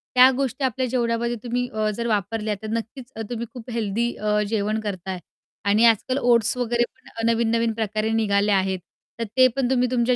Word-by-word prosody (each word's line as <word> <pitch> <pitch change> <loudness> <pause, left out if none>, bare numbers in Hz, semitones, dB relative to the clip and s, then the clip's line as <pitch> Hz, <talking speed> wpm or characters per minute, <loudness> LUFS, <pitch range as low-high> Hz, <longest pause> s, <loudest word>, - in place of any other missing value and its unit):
त्या 255 +1 +9
गोष्टी 260 -1 -1
जेवणामध्ये 235 -1 0
तुम्ही 245 +1 -1
अ, 215 0 0
जर 235 0 -2
वापरल्या 210 0 -1
तर 220 - -6
नक्कीच 240 +3 -5
अ, 225 - -5
तुम्ही 235 -1 -3
खूप 245 0 -9
हेल्दी 230 +1 -1
अ, 210 0 0
जेवण 215 0 0
करताय 190 -3 -4 0.5
आणि 210 +3 +4
आजकाल 230 +4 +3
ओट्स 240 -3 +3
वगैरे 240 -1 +1
पण 225 0 -7
नवीन-नवीन 230 0 +1
प्रकारे 215 0 -1
निघाले 205 -2 +2
आहेत. 190 -1 +1 0.4
तर - - 0
ते 255 0 +8
पण 260 -2 +1
तुम्ही 250 -1 +2
तुमच्या 245 0 +2
230 Hz, 175 wpm, -23 LUFS, 215-245 Hz, 0.5 s, त्या